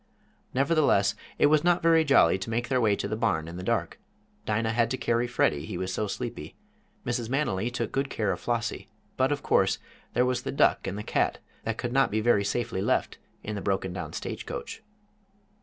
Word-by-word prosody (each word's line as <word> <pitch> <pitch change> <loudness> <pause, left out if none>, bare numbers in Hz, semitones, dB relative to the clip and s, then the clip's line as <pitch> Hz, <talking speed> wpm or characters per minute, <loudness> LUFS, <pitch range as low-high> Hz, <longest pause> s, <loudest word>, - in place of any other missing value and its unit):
Nevertheless, 135 -8 +3 0.2
it - - +4
was 150 +1 +4
not 175 0 +3
very 165 -1 +5
jolly 115 - +4
to 95 - -5
make 120 +1 -1
their 130 -2 +2
way 105 -3 +3
to - - -3
the - - -2
barn 110 -8 0
in 85 +1 -7
the - - -5
dark. - - -1 0.5
Dinah 110 +1 +1
had 115 0 +2
to 130 - -2
carry 120 0 0
Freddie, 75 -11 +1
he 95 - -4
was 95 +1 -3
so 105 +2 -1
sleepy; 120 +3 -5 0.5
Mrs. 120 -2 -2
Manily 120 -6 0
took 120 -2 -3
good 135 0 -1
care 105 -3 -1
of 90 - -3
Flossie. 120 0 -2 0.3
But, 130 +2 +2
of 145 -1 -2
course, 95 0 +3 0.4
there 125 +2 +3
was 125 0 0
the - - -4
duck - - +2
and 95 +1 -3
the 105 - -4
cat, - - 0 0.3
that 115 0 -2
could 120 0 -3
not 135 -1 +4
be 110 - 0
very 110 -2 +3
safely 115 -1 -1
left - - 0 0.2
in 105 - -4
the 100 - -4
broken 95 -2 -1
down 90 - -6
stagecoach. - - -6
115 Hz, 205 wpm, -27 LUFS, 100-130 Hz, 0.5 s, very